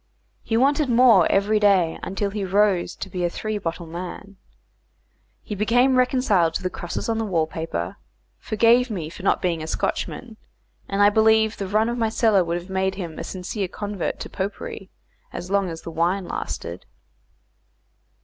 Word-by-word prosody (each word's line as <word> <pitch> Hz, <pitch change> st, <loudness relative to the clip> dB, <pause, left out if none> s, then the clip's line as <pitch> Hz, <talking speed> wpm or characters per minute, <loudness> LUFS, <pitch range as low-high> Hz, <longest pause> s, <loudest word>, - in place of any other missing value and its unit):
He 225 Hz, -, -1 dB
wanted 280 Hz, +3 st, +2 dB
more 235 Hz, -7 st, +6 dB
every 205 Hz, +2 st, +2 dB
day, 190 Hz, -6 st, +3 dB
until 200 Hz, +1 st, -2 dB
he 205 Hz, 0 st, -3 dB
rose 190 Hz, -2 st, +2 dB
to -, -, -6 dB
be 180 Hz, -1 st, -4 dB
a 175 Hz, -, +2 dB
three 215 Hz, +4 st, -4 dB
bottle 170 Hz, -2 st, -4 dB
man. 180 Hz, +4 st, -8 dB, 1.1 s
He -, -, -6 dB
became 245 Hz, +6 st, +3 dB
reconciled 250 Hz, -10 st, +2 dB
to 195 Hz, -, -2 dB
the 185 Hz, -, -1 dB
crosses 175 Hz, -, -5 dB
on 225 Hz, -1 st, 0 dB
the -, -, 0 dB
wall 175 Hz, -7 st, +1 dB
paper, 160 Hz, -, -4 dB, 0.4 s
forgave 235 Hz, +3 st, +3 dB
me 170 Hz, -7 st, -4 dB
for 195 Hz, -, -10 dB
not 195 Hz, -, +1 dB
being 170 Hz, -3 st, 0 dB
a 155 Hz, -, -5 dB
Scotchman, 225 Hz, +6 st, -3 dB, 0.5 s
and 195 Hz, +1 st, +2 dB
I 205 Hz, -, +6 dB
believe 220 Hz, 0 st, +3 dB
the 195 Hz, -, -4 dB
run 215 Hz, +3 st, +2 dB
of 240 Hz, +1 st, -2 dB
my 225 Hz, -1 st, +1 dB
cellar 220 Hz, -4 st, +3 dB
would 170 Hz, 0 st, -2 dB
have 175 Hz, +1 st, -8 dB
made 190 Hz, 0 st, -1 dB
him 170 Hz, -5 st, -6 dB
a -, -, -4 dB
sincere 185 Hz, +2 st, -4 dB
convert 205 Hz, 0 st, -4 dB
to -, -, -5 dB
popery 195 Hz, -1 st, -5 dB, 0.4 s
as 180 Hz, -, -7 dB
long 200 Hz, -2 st, +2 dB
as 165 Hz, -1 st, -7 dB
the 165 Hz, -, -6 dB
wine 175 Hz, +4 st, 0 dB
lasted. 85 Hz, +2 st, -5 dB
200 Hz, 180 wpm, -23 LUFS, 175-220 Hz, 1.1 s, more